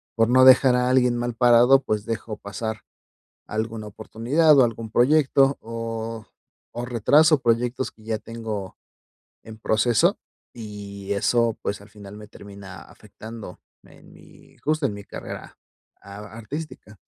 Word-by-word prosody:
por 115 Hz, 0 st, +3 dB
no 130 Hz, +1 st, +5 dB
dejar 130 Hz, 0 st, +7 dB
a 125 Hz, 0 st, +1 dB
alguien 125 Hz, -1 st, +3 dB
mal 120 Hz, 0 st, -2 dB
parado, 125 Hz, +2 st, +5 dB
pues, 105 Hz, -4 st, -3 dB
dejo 115 Hz, -1 st, -4 dB
pasar 110 Hz, +2 st, -6 dB, 0.7 s
alguna 110 Hz, 0 st, -4 dB
oportunidad 140 Hz, +9 st, +2 dB
o 130 Hz, -, +7 dB
algún 115 Hz, -1 st, -4 dB
proyecto, 135 Hz, +2 st, +3 dB
o 115 Hz, -1 st, -6 dB, 0.5 s
o 120 Hz, -, -3 dB
retraso 145 Hz, +7 st, +4 dB
proyectos 120 Hz, +1 st, -1 dB
que 110 Hz, -, -22 dB
ya 110 Hz, 0 st, -3 dB
tengo 110 Hz, -4 st, -7 dB, 0.7 s
en 110 Hz, -1 st, -12 dB
proceso. 110 Hz, +1 st, +2 dB, 0.4 s
Y 100 Hz, -3 st, -7 dB
eso, 115 Hz, +2 st, +1 dB
pues, 100 Hz, -, -3 dB
al 100 Hz, -, -15 dB
final 105 Hz, 0 st, -12 dB
me 105 Hz, 0 st, -12 dB
termina 100 Hz, -2 st, -12 dB
afectando 110 Hz, -4 st, -11 dB, 0.3 s
en -, -, -18 dB
mi, -, -, -19 dB
justo, 155 Hz, -1 st, 0 dB
en 105 Hz, -, -3 dB
mi 100 Hz, -, -9 dB
carrera -, -, -9 dB, 0.4 s
a 100 Hz, 0 st, -11 dB, 0.2 s
artística. 115 Hz, -4 st, -8 dB
115 Hz, 140 wpm, -23 LUFS, 105-125 Hz, 0.7 s, dejar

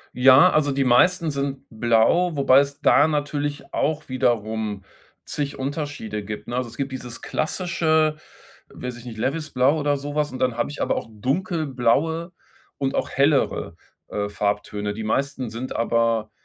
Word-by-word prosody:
Ja, 130 Hz, +7 st, +7 dB
also 145 Hz, -2 st, +2 dB
die 135 Hz, 0 st, +1 dB
meisten 160 Hz, +7 st, +3 dB
sind 140 Hz, -1 st, -3 dB
blau, 120 Hz, +10 st, +2 dB
wobei 135 Hz, -1 st, +5 dB
es 140 Hz, +1 st, -2 dB
da 145 Hz, +1 st, +5 dB
natürlich 145 Hz, -1 st, -3 dB
auch 155 Hz, -1 st, -1 dB
wiederum 110 Hz, -5 st, -1 dB, 0.4 s
zig 145 Hz, -1 st, -4 dB
Unterschiede 135 Hz, -7 st, -4 dB
gibt, 105 Hz, +1 st, -6 dB
ne? 120 Hz, -, -3 dB
Also 125 Hz, -2 st, -2 dB
es -, -, -12 dB
gibt 140 Hz, 0 st, -3 dB
dieses 125 Hz, -2 st, -7 dB
klassische- 160 Hz, -2 st, 0 dB, 0.6 s
weiß 125 Hz, -1 st, -6 dB
ich 120 Hz, -, -13 dB
nicht- 115 Hz, -3 st, -8 dB
Levisblau 140 Hz, +2 st, +1 dB
oder 145 Hz, -1 st, +1 dB
sowas 145 Hz, +1 st, -2 dB
und 130 Hz, -, -6 dB
dann 125 Hz, -2 st, 0 dB
habe 120 Hz, -, 0 dB
ich 145 Hz, -, -7 dB
aber -, -, +1 dB
auch -, -, -4 dB
dunkelblaue 155 Hz, -, 0 dB, 0.4 s
und 135 Hz, -1 st, -1 dB
auch -, -, -1 dB
hellere, 140 Hz, +1 st, +1 dB, 0.3 s
äh, 100 Hz, 0 st, -2 dB
Farbtöne. 105 Hz, 0 st, -2 dB
Die 110 Hz, +1 st, -6 dB
meisten 130 Hz, +2 st, -1 dB
sind 120 Hz, +4 st, -5 dB
aber, 115 Hz, -2 st, +1 dB
135 Hz, 155 wpm, -23 LUFS, 115-150 Hz, 0.6 s, Ja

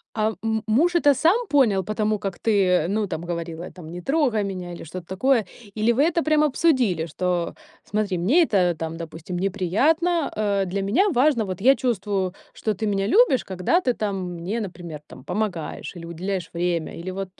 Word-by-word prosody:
Ам, 215 Hz, 0 st, 0 dB
м 220 Hz, -1 st, 0 dB
муж 325 Hz, +11 st, +3 dB
это 290 Hz, -4 st, +5 dB
сам 370 Hz, -, +2 dB
понял 230 Hz, -, +3 dB
по 215 Hz, -, -4 dB
тому, 215 Hz, -1 st, 0 dB
как 195 Hz, -3 st, -4 dB
ты, 205 Hz, -4 st, +2 dB
э, 180 Hz, -3 st, +2 dB
ну, 210 Hz, 0 st, 0 dB
там 165 Hz, -, -4 dB
говорила, 170 Hz, 0 st, -5 dB
там: 175 Hz, -4 st, -11 dB
"Не 175 Hz, -, -7 dB
трогай 265 Hz, -, +1 dB
меня" 185 Hz, -3 st, -5 dB
или -, -, -8 dB
что-то 170 Hz, +2 st, -8 dB
такое? 225 Hz, +3 st, +2 dB, 0.3 s
Или 220 Hz, +2 st, +2 dB
вы 270 Hz, +5 st, +3 dB
это 335 Hz, +1 st, +2 dB
прям 310 Hz, -1 st, +3 dB
обсудили, 255 Hz, -, +2 dB
что: 175 Hz, +1 st, -2 dB, 0.3 s
"Смотри, 210 Hz, -3 st, -1 dB
мне 255 Hz, -, +4 dB
это 180 Hz, -, +2 dB
там, 165 Hz, 0 st, -4 dB
допустим, 165 Hz, +1 st, -6 dB
неприятно, 280 Hz, -, +1 dB
э, 200 Hz, -2 st, +1 dB
для 195 Hz, +2 st, -2 dB
меня 265 Hz, -, +2 dB
важно, 260 Hz, -, +3 dB
вот 185 Hz, -1 st, -5 dB
я 265 Hz, +5 st, +6 dB
чувствую, 200 Hz, -7 st, -1 dB, 0.2 s
что 215 Hz, -, -2 dB
ты 215 Hz, +3 st, -3 dB
меня 195 Hz, -1 st, 0 dB
любишь, 415 Hz, -, +4 dB
когда 190 Hz, -, +1 dB
ты 255 Hz, -9 st, 0 dB
там 195 Hz, -5 st, -3 dB
мне, 180 Hz, +7 st, -3 dB
например, 175 Hz, -6 st, -6 dB
там -, -, -13 dB
помогаешь 190 Hz, -2 st, -3 dB
или 170 Hz, -1 st, -8 dB
уделяешь 175 Hz, +1 st, -4 dB
время"? 170 Hz, -1 st, -2 dB
Или 180 Hz, +2 st, -5 dB
вот, 195 Hz, 0 st, -5 dB
200 Hz, 195 wpm, -23 LUFS, 180-245 Hz, 0.3 s, я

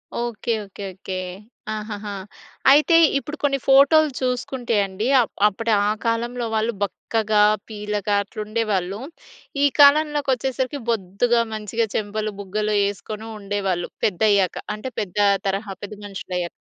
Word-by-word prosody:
Okay. 235 Hz, 0 st, -3 dB
Okay. 200 Hz, +1 st, -10 dB
Okay. 190 Hz, 0 st, -7 dB, 0.6 s
ఆహాహా! 210 Hz, -1 st, -5 dB, 0.6 s
అయితే 300 Hz, +4 st, +5 dB, 0.2 s
ఇప్పుడు 295 Hz, +2 st, -5 dB
కొన్ని 275 Hz, -1 st, +2 dB
ఫోటోలు 285 Hz, +3 st, +6 dB
చూసుకుంటే 250 Hz, -1 st, -2 dB
అండి 195 Hz, +3 st, -3 dB
ఆహ్, 235 Hz, -, +2 dB, 0.2 s
అప్పుడు 225 Hz, +3 st, -2 dB
ఆ -, -, +2 dB, 0.2 s
కాలంలో 235 Hz, +1 st, -1 dB
వాళ్ళు 220 Hz, +2 st, 0 dB
బక్కగా 215 Hz, +1 st, 0 dB, 0.3 s
పీలగా 210 Hz, -1 st, -2 dB
అట్లుండేవాళ్ళు. 210 Hz, -2 st, -2 dB, 0.6 s
ఈ -, -, +6 dB
కాలంలోకి 290 Hz, 0 st, +5 dB
వచ్చేసరికి 260 Hz, +2 st, -2 dB
బొద్దుగా, 230 Hz, +3 st, +1 dB
మంచిగా, 220 Hz, +1 st, -1 dB
చెంపలు 215 Hz, +1 st, -2 dB
బుగ్గలు 210 Hz, +2 st, -2 dB
వేసుకొని 210 Hz, +2 st, -4 dB
ఉండేవాళ్ళు 195 Hz, -3 st, -2 dB, 0.2 s
పెద్దయ్యాక. 200 Hz, -1 st, +2 dB, 0.2 s
అంటే 235 Hz, +5 st, -6 dB
పెద్ద 200 Hz, -2 st, -7 dB, 0.3 s
తరహా 195 Hz, +1 st, -2 dB
పెద్ద 205 Hz, -, -6 dB
మనుషులయ్యాక. 180 Hz, -3 st, -4 dB
215 Hz, 120 wpm, -22 LUFS, 200-245 Hz, 0.6 s, ఫోటోలు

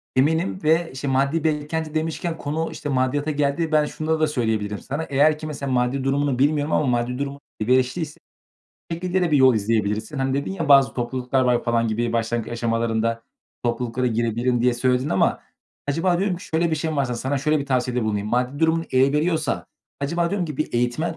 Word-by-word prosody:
Eminim 160 Hz, +8 st, +1 dB
ve, 165 Hz, +2 st, +3 dB
işte, 135 Hz, +1 st, -5 dB
maddi 140 Hz, +4 st, +1 dB
beklenti 155 Hz, 0 st, -1 dB
demişken 165 Hz, +1 st, -2 dB
konu, 155 Hz, +3 st, -3 dB
işte, 145 Hz, -, -6 dB
maddiyata 140 Hz, +3 st, 0 dB
geldi. 150 Hz, +3 st, 0 dB
Ben 150 Hz, -1 st, +4 dB
şunları 160 Hz, +1 st, -2 dB
da 155 Hz, -, +3 dB
söyleyebilirim 110 Hz, -7 st, -1 dB
sana. 145 Hz, +4 st, -4 dB
Eğer 150 Hz, +2 st, +3 dB
ki, 155 Hz, -, -6 dB
mesela, 140 Hz, -3 st, -4 dB
maddi 125 Hz, +2 st, +1 dB
durumunu 135 Hz, -1 st, 0 dB
bilmiyorum 145 Hz, +2 st, +2 dB
ama 150 Hz, -, +2 dB
maddi 125 Hz, +1 st, 0 dB
durumun 140 Hz, 0 st, -4 dB, 0.2 s
elverişli 130 Hz, +7 st, +2 dB
ise 150 Hz, -2 st, -6 dB, 0.7 s
şu 165 Hz, -, 0 dB
şekilde 180 Hz, +2 st, -1 dB
de 170 Hz, -3 st, +1 dB
bir 145 Hz, -, +5 dB
yol 130 Hz, -3 st, +6 dB
izleyebilirsin. 110 Hz, +3 st, -1 dB
Hani, 135 Hz, 0 st, 0 dB
dedin 140 Hz, +5 st, -1 dB
ya 165 Hz, -6 st, -3 dB
bazı 135 Hz, -1 st, +6 dB
topluluklar 125 Hz, +1 st, -1 dB
var 125 Hz, -1 st, +2 dB
falan 115 Hz, -1 st, +1 dB
gibi, 115 Hz, +2 st, -1 dB
başlangıç 115 Hz, 0 st, -1 dB
aşamalarında 115 Hz, -1 st, 0 dB, 0.4 s
topluluklara 125 Hz, +1 st, -1 dB
girebilirim 120 Hz, +1 st, 0 dB
diye 125 Hz, 0 st, +3 dB
söyledin 125 Hz, +2 st, +1 dB
ama 95 Hz, -, +2 dB, 0.5 s
acaba 175 Hz, +4 st, +1 dB
diyorum 195 Hz, -2 st, 0 dB
ki 195 Hz, -, -11 dB
şöyle 160 Hz, +1 st, 0 dB
bir -, -, +2 dB
şey 160 Hz, +1 st, -2 dB
mi 155 Hz, -, -3 dB
varsa, 125 Hz, -3 st, 0 dB
sana 130 Hz, +4 st, -1 dB
şöyle 150 Hz, +2 st, +1 dB
bir 140 Hz, -, -4 dB
tavsiyede 125 Hz, -2 st, 0 dB
bulunayım. 105 Hz, -1 st, -1 dB
Maddi 125 Hz, +5 st, -1 dB
durumun 165 Hz, 0 st, +2 dB
el 135 Hz, +2 st, +3 dB
veriyorsa, 155 Hz, 0 st, 0 dB, 0.3 s
acaba 170 Hz, +4 st, 0 dB
diyorum 185 Hz, -2 st, -1 dB
ki 150 Hz, -4 st, -6 dB
bir 155 Hz, -, -2 dB
eğitmen 125 Hz, +8 st, 0 dB
140 Hz, 195 wpm, -23 LUFS, 120-155 Hz, 0.7 s, yol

